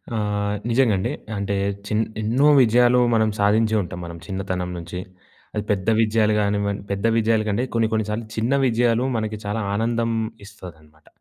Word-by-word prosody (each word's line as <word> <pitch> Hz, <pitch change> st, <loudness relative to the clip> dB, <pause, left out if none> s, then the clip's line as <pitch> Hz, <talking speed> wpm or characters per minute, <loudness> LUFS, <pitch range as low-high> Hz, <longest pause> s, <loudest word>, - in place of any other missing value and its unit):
ఆహ్, 105 Hz, -1 st, -1 dB
నిజంగండి. 115 Hz, -3 st, +2 dB, 0.3 s
అంటే, 100 Hz, 0 st, -2 dB, 0.3 s
చిన్ 110 Hz, +1 st, +1 dB, 0.2 s
ఎన్నో 125 Hz, +7 st, +2 dB
విజయాలు 120 Hz, +1 st, +4 dB, 0.2 s
మనం 110 Hz, -1 st, +3 dB
సాధించే 110 Hz, +2 st, +3 dB
ఉంటాం 90 Hz, 0 st, -7 dB
మనం 85 Hz, 0 st, -8 dB
చిన్నతనం 95 Hz, -2 st, -3 dB
నుంచి. 85 Hz, +1 st, -6 dB, 0.6 s
అది 105 Hz, -, -1 dB
పెద్ద 100 Hz, +2 st, 0 dB
విజయాలు 110 Hz, -1 st, +2 dB
గానివ్వం 100 Hz, 0 st, 0 dB
పెద్ద 100 Hz, +2 st, -2 dB
విజయాల 110 Hz, -1 st, +2 dB
కంటే 105 Hz, +4 st, 0 dB
కొన్ని 115 Hz, -1 st, +3 dB
కొన్ని 110 Hz, -1 st, +1 dB
సార్లు 110 Hz, +2 st, -3 dB
చిన్న 115 Hz, +5 st, +1 dB
విజయాలు 120 Hz, +1 st, +2 dB
మనకి 110 Hz, -1 st, -3 dB
చాలా 105 Hz, +2 st, -2 dB, 0.2 s
ఆనందం 115 Hz, +1 st, 0 dB, 0.4 s
ఇస్తదనమాట. 80 Hz, -7 st, -14 dB
105 Hz, 150 wpm, -22 LUFS, 100-115 Hz, 0.6 s, విజయాలు